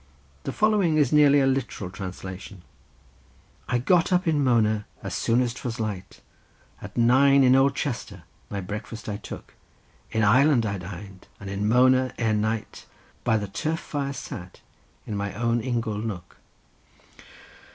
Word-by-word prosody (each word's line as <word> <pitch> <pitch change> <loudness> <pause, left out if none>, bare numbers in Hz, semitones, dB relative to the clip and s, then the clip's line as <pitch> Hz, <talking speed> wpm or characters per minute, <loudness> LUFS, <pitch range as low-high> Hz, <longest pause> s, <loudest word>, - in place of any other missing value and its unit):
The - - -2
following 205 -7 +2
is 145 -3 +3
nearly 145 -1 +6
a - - +3
literal 130 -8 -2
translation:— 95 0 -8 1.1
"I 125 - +2
got 170 +9 +2
up 180 0 +2
in 150 -3 +2
Mona 110 -4 +2 0.2
as - - -4
soon 115 +2 +2
as 120 -2 -2
'twas 120 -2 -5
light, 105 -4 -5 0.6
At - - -10
nine 135 +4 +5
in 130 0 +6
old 135 +1 +4
Chester 115 - -4 0.3
my 100 -1 -4
breakfast 105 +4 -7
I 105 -1 -3
took; 105 - -10 0.6
In 110 - 0
Ireland 125 +3 +4
I 100 -2 -2
dined, 95 +1 -10
and 100 0 -7
in 100 +1 -1
Mona, 130 +1 +4
ere 110 -2 +1
night, 110 0 -2 0.4
By 115 -2 +2
the 105 -1 -3
turf 155 +11 -2
fire 140 -2 -3
sat, 95 -10 -8 0.4
in 105 - -4
my 100 -1 -3
own 115 +1 0
ingle 115 -3 -2
nook." 100 -6 -6
115 Hz, 150 wpm, -25 LUFS, 100-135 Hz, 1.1 s, nearly